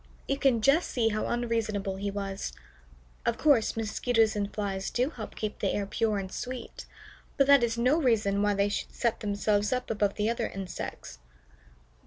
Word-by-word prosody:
You 275 0 -1
can 260 -6 +3
just 295 +8 +4
see 230 -3 +1
how 215 0 -1
unreasonable 220 -5 -1
he 200 +1 -2
was. 195 -1 -4 0.7
Of 235 - 0
course, 265 -8 +3
Mosquitoes 225 0 +1
and 205 -1 -2
Flies 195 -2 -3
do 255 +5 0
help 220 -8 -8
keep 215 -1 -4
the 195 - +1
air 205 - -1
pure 215 +1 0
and 190 -1 -4
sweet, 250 +3 -6 0.5
but 275 - +5
that 280 -1 +7
is 230 0 0
no 255 +7 +3
reason 210 -6 +2
why 205 0 +2
they 200 +1 +2
should 205 - -4
set 235 -2 0
themselves 205 0 0
up 250 -2 -1
above 205 -2 0
the 210 0 0
other 230 +1 0
insects. 185 - -7
215 Hz, 180 wpm, -29 LUFS, 200-240 Hz, 0.7 s, that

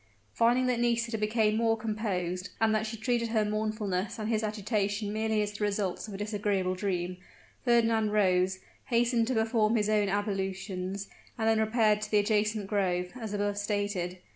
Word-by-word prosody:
Finding 240 +2 +3
that 250 -2 +1
Nisida 235 -1 +1
became 215 0 +2
more 225 0 +2
composed, 200 -5 -2
and 225 -1 +3
that 215 0 0
she 225 +1 -5
treated 235 +1 0
her 220 -2 +2
mournfulness 215 -2 -2
and 215 -1 -3
his 220 -2 +1
agitation 210 -1 -1
merely 220 -1 +1
as 205 - -3
the 210 0 -5
results 200 -1 -1
of 205 - -7
a - - -5
disagreeable 205 -3 -1
dream, 180 -2 -2 0.5
Fernand 230 -3 +3
rose, 190 -2 +2 0.3
hastened 235 -1 +2
to 260 - 0
perform 220 0 +2
his 210 -2 +1
own 210 -2 +2
ablutions, 195 -1 -2 0.3
and 220 -1 0
then 225 0 +4
repaired 220 -1 +3
to 210 - -4
the 210 - +3
adjacent 210 0 +1
grove, 180 -3 0
as 225 -4 -6
above 205 0 -1
stated. 205 -3 -2
210 Hz, 170 wpm, -29 LUFS, 200-225 Hz, 0.5 s, then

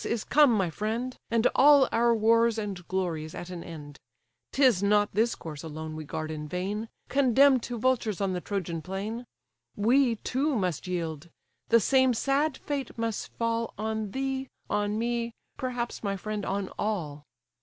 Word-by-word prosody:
is 230 -2 -1
come, 295 -3 +5
my 190 -6 +1
friend; 225 +8 -3
And 230 0 +1
all 285 -1 +7
our 235 0 +3
wars 230 +1 +3
and 195 -5 -5
glories 165 -5 -2
at 175 - -7
an 175 -2 -6
end! 145 -4 -10 0.5
'Tis 255 -9 +4
not 205 +1 +3
this 225 +4 +2
corse 150 -3 -8
alone 160 0 -6
we 155 0 -6
guard 155 +1 -4
in 150 -1 -5
vain, 200 +7 -3 0.2
Condemn'd 270 -1 +4
to 240 0 -5
vultures 230 -4 +1
on 195 -2 0
the 180 - -3
Trojan 175 -5 -3
plain; 205 +8 -5 0.5
We 240 +3 +3
too 270 +6 -1
must 185 -5 -1
yield: 165 -3 -3 0.4
the 230 - +5
same 260 +2 +3
sad 275 +4 +1
fate 280 -5 -4
must 230 -1 -3
fall 230 0 -1
On 220 0 -2
thee, 265 +3 -2 0.2
on 205 0 0
me, 235 0 -1 0.2
perhaps, 245 -2 -3
my 200 -2 -2
friend, 210 +1 -4
on 195 0 -2
all. 160 -9 -2
215 Hz, 165 wpm, -28 LUFS, 180-240 Hz, 0.5 s, all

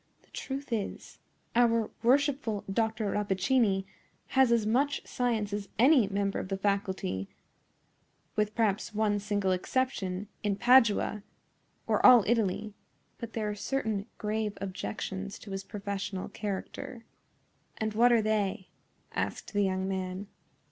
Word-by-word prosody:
The - - -29
truth 270 -1 -5
is, 210 -3 -4 0.4
our 230 -2 +3
worshipful 260 -3 +2
Dr. 220 +1 -1
Rappaccini 200 0 +1 0.4
has 265 -2 +4
as 230 -2 +3
much 270 +6 +1
science 225 -5 -1
as 205 -2 -4
any 255 -1 +6
member 200 0 -1
of - - -4
the 195 0 -2
faculty—with 195 - -4
perhaps 215 -1 0
one 210 -1 +2
single 205 -2 0
exception—in 200 -1 -1
Padua, 230 -2 +4 0.6
or - - +1
all 245 -4 +9
Italy; 215 -2 0 0.5
but 230 -1 -7
there 220 -2 -2
are 210 - -1
certain 215 -2 -2
grave 215 0 -2
objections 190 - -4
to 205 - -11
his 195 0 -4
professional 200 -2 -4
character." 210 +3 -5 0.7
"And 220 -1 -2
what 240 +3 +5
are 230 -2 +4
they?" 205 -3 0 0.4
asked - - -3
the 205 - +2
young 190 -1 0
man. 190 0 -3
210 Hz, 125 wpm, -30 LUFS, 195-230 Hz, 0.7 s, all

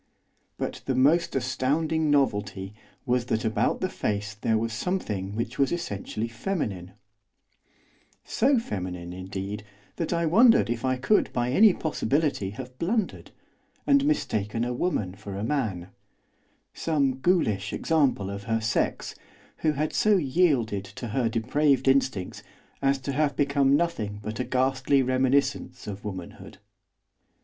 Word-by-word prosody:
But - - -4
the 130 - 0
most 145 +7 +3
astounding 150 +5 0
novelty 105 -8 0 0.3
was 125 -1 +1
that 110 0 -1
about 110 - 0
the 185 - +1
face 105 - -2
there 110 +1 0
was 115 +1 -2
something 105 - -3
which 115 - -4
was 140 - +3
essentially 110 - -3
feminine; 110 - -4 1.3
so 265 +3 +2
feminine, 90 - -4
indeed, 95 +2 -5 0.3
that 165 - -2
I 170 -1 +1
wondered 225 - +5
if 115 -1 -3
I 130 0 +1
could 170 +12 +2
by 120 0 0
any 210 +9 +7
possibility 145 - -1
have 125 +4 -9
blundered, 205 +4 -1 0.6
and 280 -1 +4
mistaken 115 - 0
a 125 +1 -1
woman 120 - -1
for 100 0 -8
a 100 - -3
man; 110 -9 -2 0.8
some 140 -5 0
ghoulish 110 - +1
example 140 - +1
of 100 0 -7
her 115 0 0
sex, 110 -1 -1 0.4
who 155 -1 +1
had 150 +2 -2
so 215 -1 +4
yielded 135 - +1
to 120 +4 -7
her 115 +1 0
depraved 130 +4 +1
instincts 130 -8 +1 0.4
as 135 0 +2
to 140 - -3
have 145 0 +1
become 140 0 +3
nothing 110 -12 -2
but 110 +2 -5
a - - +1
ghastly 130 +1 +2
reminiscence 130 +2 0
of 100 -1 -7
womanhood. 95 -5 -8
130 Hz, 140 wpm, -26 LUFS, 105-150 Hz, 1.3 s, any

